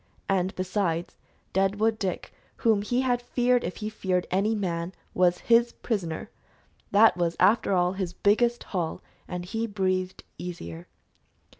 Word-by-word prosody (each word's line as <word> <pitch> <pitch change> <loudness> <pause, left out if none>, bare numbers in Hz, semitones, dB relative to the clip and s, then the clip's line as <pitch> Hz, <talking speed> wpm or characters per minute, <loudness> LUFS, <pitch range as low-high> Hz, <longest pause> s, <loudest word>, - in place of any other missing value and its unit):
And, 190 -1 0
besides, 180 -3 -1 0.4
Deadwood 205 +3 +2
Dick 190 -4 -3 0.2
whom 220 -3 +2
he 245 +5 0
had 245 -2 +1
feared 245 0 +1
if - - -4
he 215 -1 -4
feared 185 -4 -1
any 200 +4 +2
man 175 -3 -2 0.2
was 180 -1 +3
his 235 0 +4
prisoner! 175 -9 -3 0.6
That 215 +2 +6
was, 170 -1 0
after 210 -1 +4
all, 180 0 +2
his 190 -3 -3
biggest 235 +6 +2
haul, 175 -5 -3 0.2
and 180 -1 -5
he 225 +5 -2
breathed 185 -3 -1 0.2
easier. 85 - -7
195 Hz, 140 wpm, -27 LUFS, 180-220 Hz, 0.6 s, That